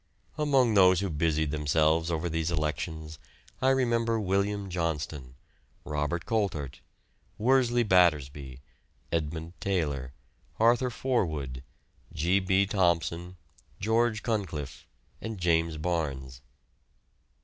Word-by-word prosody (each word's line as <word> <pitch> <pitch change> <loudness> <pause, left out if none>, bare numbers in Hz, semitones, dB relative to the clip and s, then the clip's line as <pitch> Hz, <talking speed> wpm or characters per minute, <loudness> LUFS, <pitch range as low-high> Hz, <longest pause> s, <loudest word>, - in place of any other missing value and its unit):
Among 135 -6 +3
those 95 -2 +5
who 100 -3 -2
busied 80 -1 0
themselves 80 +2 +2
over 85 +1 -1
these 80 0 -1
elections 80 -1 -3 0.4
I 130 - +4
remember 115 -3 +2
William 100 0 0
Johnston, 80 -7 -3 0.5
Robert 75 +3 -2
Coltart, 90 - -2 0.6
Worsley 120 0 +3
Battersby, 75 - +2 0.5
Edmund 80 +1 -3
Taylor, 75 -9 -1 0.5
Arthur 120 +3 +4
Forwood, 80 - -2 0.5
G. 90 +6 +2
B. 95 +1 +2
Thomson, 90 -2 0 0.4
George 110 +1 +1
Cunliffe, 80 - -3 0.3
and 110 -1 -5
James 85 -2 +1
Barnes. 70 -6 -3
85 Hz, 95 wpm, -28 LUFS, 75-105 Hz, 0.6 s, those